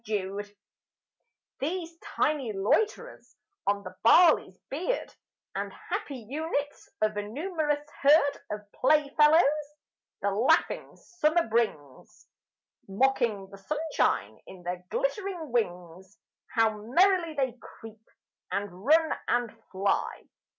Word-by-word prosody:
Insects 205 0 -3 1.1
These 335 +3 -3 0.2
tiny 280 -7 0
loiterers 435 - -1 0.3
on 200 0 +1
the - - -9
barley's 310 - +5
beard, 360 - -2 0.4
And - - -3
happy 260 -6 -6
units 290 +1 -3
of 215 -1 +1
a - - 0
numerous 295 - -2
herd 285 0 +5
Of 210 0 -4
playfellows, 300 +3 +4 0.8
the 200 - +2
laughing 215 +6 +1
Summer 340 -1 0
brings, 215 - -2 0.6
Mocking 220 -2 +1
the 195 - -11
sunshine 295 - -1
in 185 -2 -12
their 180 +1 -4
glittering 395 - -2
wings, 180 -4 -3 0.4
How 220 -2 +3
merrily 335 - +3
they 260 -3 -1
creep, 225 -1 -13 0.5
and 205 +1 -1 0.2
run, 315 +4 +4
and 240 -2 0 0.2
fly! 195 +1 -1
260 Hz, 105 wpm, -28 LUFS, 205-315 Hz, 1.1 s, barley's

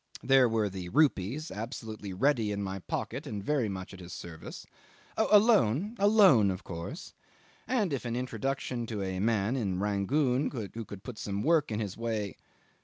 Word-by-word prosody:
There 135 -2 +5
were 110 -2 +1
the 95 -2 -6
rupees 145 - +1
absolutely 110 -2 -6
ready 115 +1 +1
in 100 0 -2
my 95 0 -4
pocket - - -4
and 100 -2 -4
very 135 -4 +1
much 95 0 -6
at 95 - -10
his 85 -1 -9
service. 80 -2 -8 0.5
Oh! 220 - +2
a 210 - +9
loan; 205 - +3
a 200 - +4
loan 190 - +6
of 95 0 -4
course 85 - -7 0.5
and 215 - +1
if 135 - -2
an 120 -1 -3
introduction 125 -1 -2
to 105 -3 -3
a 95 -1 -3
man 110 +2 +1
(in 100 -8 -1
Rangoon) 125 +7 +1
who 115 -2 -6
could 100 -1 -10
put 125 -4 -8
some 100 0 -3
work 160 -1 +3
in 105 - -1
his 100 -3 -3
way 110 -3 -2
110 Hz, 180 wpm, -30 LUFS, 100-135 Hz, 0.5 s, a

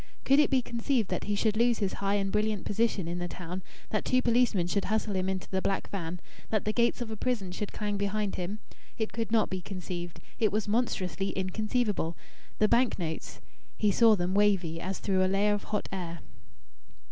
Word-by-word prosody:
Could 275 +2 +6
it 300 - +5
be 260 -3 +3
conceived 235 -2 0
that - - -2
he 205 - 0
should 215 +1 +1
lose 235 +1 +3
his 200 -3 -1
high 200 0 +2
and 195 -1 0
brilliant 210 -1 0
position 205 -4 +1
in 175 +1 -3
the 175 - -2
town, 180 +1 -6 0.3
that 215 - 0
two 255 - +3
policemen 235 -7 +3
should 195 +3 0
hustle 215 -1 0
him 185 0 0
into 190 -1 -3
the 190 -1 0
black 195 0 -1
van, 180 -2 -4 0.3
that 215 -2 0
the 215 - 0
gates 235 +1 +2
of 230 -2 -3
a - - -3
prison 215 -5 -1
should 200 +3 -4
clang 205 -1 -2
behind 205 0 -1
him? 185 +4 -3 0.4
It 220 -1 -2
could 230 -1 -2
not 225 -3 +3
be 185 -1 -2
conceived. 175 -2 -6 0.2
It 215 -2 +3
was 215 0 0
monstrously 195 -4 0
inconceivable.... 205 -2 0 0.4
The 215 - +4
bank 245 +3 +3
notes... 160 -4 -5 0.4
he 210 -2 +3
saw 225 +1 +6
them 180 -1 -1
wavy, 195 -5 +2
as 190 +1 -3
through 190 -2 +1
a - - +3
layer 205 +2 +3
of 205 - -3
hot 210 -1 -2
air. 175 -3 -4
205 Hz, 205 wpm, -29 LUFS, 185-220 Hz, 0.4 s, Could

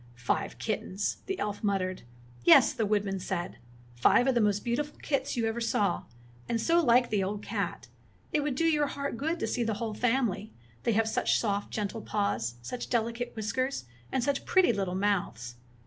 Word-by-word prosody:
"Five 120 - -1
kittens!" 200 +2 -2
the 385 -1 -2
elf 205 - -3
miittered. 190 -3 0 0.4
"Yes," 170 - +7
the 225 -5 0
woodman 200 -2 0
said, 180 -1 -4 0.3
"five 120 - +4
of 265 - +3
the 240 - +3
most 205 -1 +1
beautiful 290 +5 -2
kits 275 -3 -1
you 230 - +1
ever 225 +1 -1
saw, 210 -3 +1 0.4
and 230 - +1
so 335 +8 +3
like 245 -1 +4
the 205 -3 +2
old 205 +2 -3
cat! - - -3 0.5
It 305 - +3
would 290 -2 -1
do 330 - +1
your 300 -3 +3
heart 280 -2 -3
good 320 +7 -2
to - - 0
see 245 - -1
the 225 -2 -1
whole 220 0 -3
family, 225 -3 0 0.3
they 230 - +3
have 225 +1 +2
such 220 - +2
soft, 205 -2 -1
gentle 215 +1 -3
paws, 120 - -1
such 245 - -5
delicate 235 +1 -1
whiskers, 245 - -2 0.3
and 260 - 0
such 280 +1 0
pretty 370 -9 +4
little 195 -3 -2
mouths! 125 - -1
225 Hz, 185 wpm, -29 LUFS, 200-255 Hz, 0.5 s, Yes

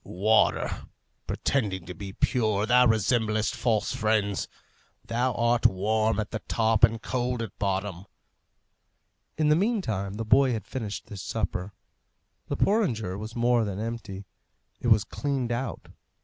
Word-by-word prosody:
"Water! 105 +4 +1 0.4
pretending 100 -10 -1
to 90 - -7
be 95 +2 -7
pure, 110 -1 +1
thou 125 +2 +5
resemblest 110 0 +1
false 115 -1 0
friends. 110 -5 0 0.6
Thou 120 +3 0
art 120 0 +3
warm 110 +2 0
at 105 - -3
the 110 - -4
top 110 -1 +1
and 115 0 +5
cold 125 0 -2
at 110 - -8
bottom." 100 -1 -2 1.3
In 155 -1 +2
the 150 - +5
meantime 155 - -1
the 115 +1 -4
boy 130 +3 +4
had 110 -4 -4
finished 110 -6 -5
his 100 -3 -7
supper. 100 -3 -3 0.7
The - - -3
porringer 120 - +1
was 110 +3 -7
more 120 0 +3
than 100 -2 -4
empty; 110 -3 -5 0.5
it - - -3
was 110 -3 +5
cleaned 135 +1 -2
out. 120 +1 -4
110 Hz, 140 wpm, -27 LUFS, 100-120 Hz, 1.3 s, thou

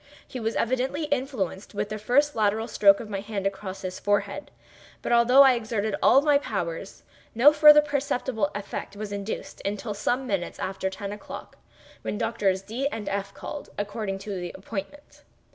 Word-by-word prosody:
He 255 - -6
was 225 0 -2
evidently 260 +5 0
influenced 255 - -3
with 205 0 -2
the 215 0 -4
first 285 +7 +2
lateral 220 +1 +1
stroke 200 -3 +5
of 230 - -7
my 200 -2 -3
hand 200 -1 -4
across 195 -1 -4
his 185 0 -5
forehead; 205 +8 -1 0.5
but - - -2
although 240 +3 +7
I 265 -1 +6
exerted 220 -3 -2
all 275 - +6
my 295 -2 +4
powers, - - -4 0.3
no 275 +6 +7
further 300 0 +8
perceptible 265 -7 -1
effect 205 0 -5
was 210 0 -6
induced 200 +1 -5
until 205 +2 -3
some 245 +6 -1
minutes 195 -7 -2
after 190 0 -3
ten 195 +1 -6
o'clock, 210 - -9 0.4
when - - -3
Doctors 210 -5 0
D—— 235 +7 -2
and 210 -3 -5
F—— 200 0 -3
called, 295 - -7
according 205 -1 -3
to 185 -4 -4
appointment. 210 +9 -8
215 Hz, 165 wpm, -26 LUFS, 200-260 Hz, 0.5 s, further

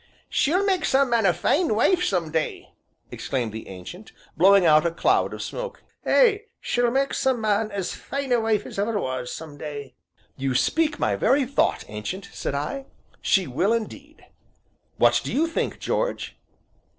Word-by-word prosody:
"She'll 365 +7 +2
make 380 -3 +1
some 270 -1 +2
man 230 -4 +3
a - - +5
fine 270 - +1
wife, 360 - +3
some 175 - 0
day!" 160 -1 -3 0.4
exclaimed 125 -5 -3
the 110 - -7
Ancient, 95 - -10 0.2
blowing 195 +1 +6
out 155 -1 +6
a 170 - +2
cloud 165 - +1
of - - -5
smoke, - - -6 0.2
"ay, 435 -4 +4
she'll 245 0 +1
mak' 270 +3 0
some 260 -2 +1
man 215 0 +1
as 200 -3 -3
fine 275 -1 -5
a 240 - +4
wife 220 -2 0
as - - -7
ever 210 +1 0
was, 130 -4 -3
some 155 -3 -8
day." 145 -2 -7 0.4
"You 135 -1 -2
speak 310 - +1
my - - +1
very 270 +1 +2
thought, 275 +3 +1
Ancient," 180 - -6
said - - -3
I, 270 - -4 0.3
"she 190 -2 +2
will 175 - +1
indeed; 280 +7 -5 0.7
what - - +4
do - - -4
you 310 +4 +2
think, 330 - -2
George?" - - -2
215 Hz, 170 wpm, -24 LUFS, -, 0.7 s, blowing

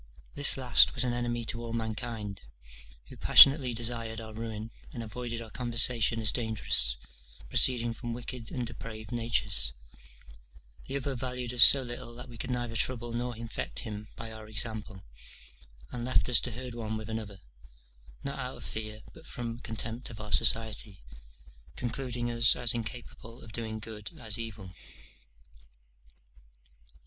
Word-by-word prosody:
This 145 -1 +5
last 125 -3 +6
was 125 - +1
an 125 -1 -1
enemy 120 -1 -3
to 115 +1 -3
all 115 -1 -7
mankind, 110 -2 -5 0.7
who - - -12
passionately 135 -2 +7
desired 115 -1 -1
our 110 -1 -9
ruin, 110 0 -7 0.2
and 120 - -7
avoided 115 +1 -6
our 110 - -12
conversation 115 -1 +2
as 110 -2 +2
dangerous, 105 - +5 0.5
proceeding 120 -2 +6
from 120 +1 -7
wicked 120 0 -7
and 125 -2 -4
depraved 110 -1 -8
natures: 115 -4 +2 1.1
the 135 - -3
other 140 0 -4
valued 125 -1 -5
us 120 -2 +8
so 135 -1 +9
little 120 -1 -7
that 125 +2 -10
we 120 -2 -12
could 130 - -3
neither 120 -2 -4
trouble 120 0 0
nor 120 0 -4
infect 115 0 -5
him 105 -1 -8
by 115 0 -7
our 110 -1 -10
example; 110 -3 -5 0.9
and 120 -1 -5
left 130 - +1
us 120 - +5
to 125 - -3
herd 125 +1 -8
one 110 -2 -5
with 110 -1 -8
another, 110 -3 -7 0.8
not 140 0 -5
out 130 0 -5
of - - -9
fear, 110 0 -6
but 165 - -14
from 120 -1 -6
contempt 115 +2 -4
of 110 -3 -10
our 105 -1 -8
society: 110 - 0 0.7
concluding 120 -1 -4
us 115 -1 +3
as 120 -1 +1
incapable 115 0 -8
of 110 - -12
doing 110 -1 -5
good 105 -1 -8
as 110 -2 +2
evil. 105 -5 -8
115 Hz, 155 wpm, -28 LUFS, 110-120 Hz, 1.1 s, so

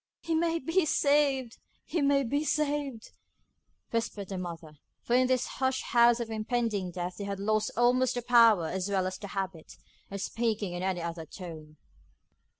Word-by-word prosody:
'He 330 - -1
may 330 +1 +1
be 330 +5 +1
saved! 280 -5 +2 0.3
he 335 - -1
may 280 0 +3
be 285 +5 0
saved,' 290 -6 -1 0.8
whispered 220 -4 -2
the 190 - -4
mother; 165 -4 -8 0.2
for 240 - -2
in 255 0 +4
this 255 -1 +1
hushed 260 0 -1
house 235 0 +5
of 230 -1 -4
impending 220 -3 -1
death 180 0 -5
they 200 - -4
had 200 -1 -4
lost 215 +1 +1
almost 250 +1 +3
the 245 - -3
power 230 -7 +6
as 190 +3 -3
well 190 -2 +1
as 185 0 -4
the 205 - -7
habit, 190 -5 -5 0.3
of 200 - -5
speaking 215 -3 -2
in 175 - -4
any 185 -2 -1
other 165 -1 -5
tone. 155 -4 -10
225 Hz, 170 wpm, -29 LUFS, 185-260 Hz, 0.8 s, power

